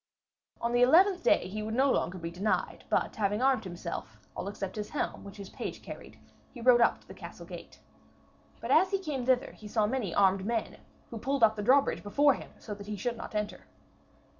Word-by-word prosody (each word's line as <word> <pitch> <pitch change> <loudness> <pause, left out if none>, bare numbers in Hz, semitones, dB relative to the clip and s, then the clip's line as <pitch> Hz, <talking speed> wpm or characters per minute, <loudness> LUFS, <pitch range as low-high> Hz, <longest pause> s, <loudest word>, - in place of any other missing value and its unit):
On 235 - -1
the 245 - +3
eleventh 360 +8 +5
day 180 - +3
he 210 +3 -5
would 220 +1 -3
no 270 +2 +4
longer 185 - 0
be 165 -1 -5
denied, 195 +5 -2
but - - 0
having 205 0 0
armed 260 -3 +2
himself, 175 -1 -6 0.2
all - - -4
except 195 -1 -5
his 210 -1 -4
helm, 295 - -3
which 200 +1 -11
his 200 -1 -9
page - - -6
carried, - - -10 0.3
he 245 - -11
rode 240 0 +5
up 235 - +3
to - - -25
the - - -10
castle - - -10
gate. - - -10 0.8
But - - -4
as 375 - +5
he 395 - +1
came 290 -9 -4
thither 255 -1 +2
he 215 - -12
saw 210 0 +1
many 220 -4 -2
armed 190 +1 +3
men, 225 +1 -2 0.3
who 230 - -5
pulled 270 +2 0
up 220 -1 +6
the 210 - -4
drawbridge 270 +6 +3
before 280 +7 +3
him, - - -9
so 210 - -7
that 200 0 -10
he 210 - -3
should 240 +3 -2
not 230 - -8
enter. 210 0 -3
220 Hz, 215 wpm, -30 LUFS, 205-260 Hz, 0.8 s, up